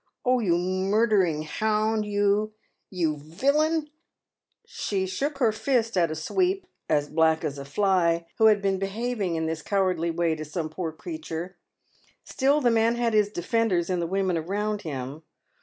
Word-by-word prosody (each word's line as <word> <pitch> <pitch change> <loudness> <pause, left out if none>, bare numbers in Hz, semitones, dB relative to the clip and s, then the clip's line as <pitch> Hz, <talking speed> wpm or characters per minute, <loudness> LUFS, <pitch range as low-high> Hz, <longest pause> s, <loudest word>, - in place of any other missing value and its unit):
Oh, 255 0 +3
you 175 -7 +2
murdering 185 -2 +1
hound, 215 +5 0
you! 205 +1 +1 0.4
you 165 -5 -1
villun 295 - 0 0.4
!" - - -54
She 195 -2 -2
shook 275 +10 -2
her 240 -5 +3
fist 230 0 0
at 170 -3 +3
a 155 - -3
sweep 370 - 0
— - - -54
as 150 -2 +2
black 160 +1 +2
as 140 -1 -3
a 140 - -7
fly 170 0 +1
— - - -42
who 220 - +7
had 210 -2 +4
been 195 -1 +1
behaving 200 -2 -2
in 160 0 -1
this 160 0 -3
cowardly 185 -3 0
way 165 0 +1
to 155 -1 -5
some 155 +1 -4
poor 165 +1 -4
creature. 180 - -6 0.7
Still 280 +3 +1
the 245 -3 +3
man 230 +1 +3
had 235 -1 0
his 210 -1 +3
defenders 190 -2 0
in 180 - 0
the 170 - -1
women 190 -2 0
around 205 +5 -2
him. 140 0 -6
195 Hz, 175 wpm, -26 LUFS, 165-225 Hz, 0.7 s, who